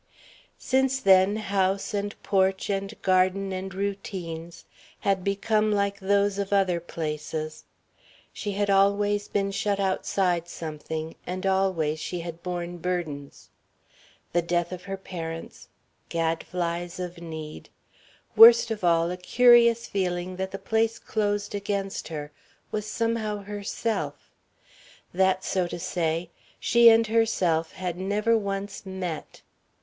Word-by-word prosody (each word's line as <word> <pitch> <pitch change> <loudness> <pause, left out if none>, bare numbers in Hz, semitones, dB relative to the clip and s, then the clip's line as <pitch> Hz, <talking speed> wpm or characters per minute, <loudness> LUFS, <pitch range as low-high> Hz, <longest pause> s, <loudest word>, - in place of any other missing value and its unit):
Since 265 0 +1
then 190 -1 +5
house 195 -2 0
and 205 0 -2
porch 190 0 +1
and 195 +2 -3
garden 185 +1 +2
and 190 +1 -4
routines 180 -4 -5 0.4
had 195 -3 +1
become 215 +2 +1
like 200 -1 0
those 200 +1 +1
of 200 0 -3
other 190 -3 +2
places. 155 -1 -5 0.7
She 205 - -4
had 200 0 0
always 205 +1 +3
been 195 -1 -1
shut 200 0 -1
outside 185 -2 0
something, 160 -1 -5
and 185 +2 -4
always 185 -5 +1
she 175 +2 -4
had 170 0 -7
borne 175 -1 -4
burdens. 160 -6 -4 0.8
The 175 - +3
death 175 +1 -1
of 180 0 -7
her 195 0 -4
parents, 165 -4 -7 0.4
gadflys 170 +1 -2
of 175 -1 -5
need, 160 -2 -8 0.7
worst 230 0 +9
of 215 -3 -4
all 170 0 +3
a 180 - -4
curious 235 +4 +5
feeling 180 -1 -2
that 190 0 -2
the 195 - -6
place 225 +2 0
closed 205 -1 -2
against 200 -1 -3
her 150 -2 -6 0.4
was 210 0 -3
somehow 220 -2 -1
herself 200 - -4 0.8
that, 190 +1 +2
so 185 -2 0
to 175 - -5
say, 165 0 -2 0.3
she 235 0 +6
and 225 0 +5
herself 195 -8 +1
had 180 -1 -4
never 210 +4 +1
once 200 -1 -3
met. 190 -4 -6
190 Hz, 125 wpm, -26 LUFS, 175-205 Hz, 0.8 s, worst